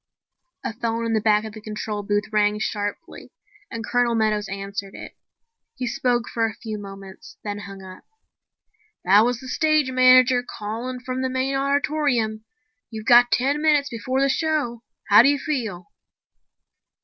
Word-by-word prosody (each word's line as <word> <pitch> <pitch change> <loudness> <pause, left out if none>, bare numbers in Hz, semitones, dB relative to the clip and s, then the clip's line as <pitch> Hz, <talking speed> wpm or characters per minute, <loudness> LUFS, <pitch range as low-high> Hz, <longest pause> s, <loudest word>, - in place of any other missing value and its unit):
A - - -3
phone 230 0 -2
in 230 - -1
the 220 - +1
back 210 0 +2
of 215 - -8
the 215 - -10
control 210 0 -5
booth 205 +1 0
rang 210 0 +2
sharply 210 - -5 0.4
and 225 -1 -6
Colonel 245 -1 +1
Meadows 215 -2 0
answered 195 0 -6
it. - - -10 0.6
He 255 - -4
spoke 240 0 0
for 225 -1 0
a 220 - -7
few 215 -2 -6
moments, 195 -1 -11
then 205 -1 -4
hung 195 -1 -10
up. 185 0 -12 1.0
"That 200 +4 +6
was 245 -1 -1
the 260 - -10
stage 305 0 +1
manager 255 0 +5
calling 245 +2 -6
from 255 0 -4
the 260 - -1
main 260 +1 -1
auditorium. 275 -5 0 0.4
You've 220 -2 -8
got 245 0 +6
ten 280 +4 +1
minutes 295 -2 +3
before 255 +3 -2
the 275 - +3
show. 275 -5 -1 0.3
How 210 +1 +9
do 260 - +5
you 285 - +2
feel?" 225 - -4
230 Hz, 160 wpm, -23 LUFS, 210-260 Hz, 1.0 s, How